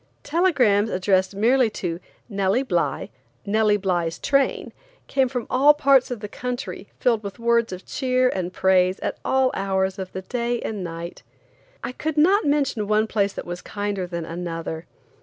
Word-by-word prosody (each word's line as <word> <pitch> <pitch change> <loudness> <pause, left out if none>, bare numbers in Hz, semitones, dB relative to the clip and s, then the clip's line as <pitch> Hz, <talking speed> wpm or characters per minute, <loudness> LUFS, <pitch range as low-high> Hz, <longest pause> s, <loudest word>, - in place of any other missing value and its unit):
Telegrams 260 - +3
addressed 190 0 +1
merely 240 +4 +3
to 175 -5 -4 0.3
"Nellie 200 +3 +1
Bly, 265 - -1 0.3
Nellie 210 0 +3
Bly's 175 -4 -1
Train," 275 -1 0 0.3
came 265 -2 +1
from 245 -2 -3
all 285 +3 +5
parts 275 -3 +4
of 245 -4 -5
the 210 - -4
country 215 -4 -5
filled 230 -3 +2
with 200 -2 -7
words 235 -1 +2
of 185 0 -7
cheer 255 -1 +1
and 185 -4 -3
praise 185 0 +3
at - - -3
all 265 -1 +2
hours 190 0 -1
of 185 -1 -5
the 190 - -6
day 240 +3 -2
and 210 -4 -4
night. 170 0 -7 0.6
I - - -3
could 310 +4 -4
not 380 +8 +4
mention 275 -7 +1
one 215 +1 +3
place 200 -2 0
that - - -6
was 175 0 -6
kinder 205 -2 -3
than 170 -2 -4
another. 165 -1 -5
210 Hz, 165 wpm, -23 LUFS, 185-255 Hz, 0.6 s, all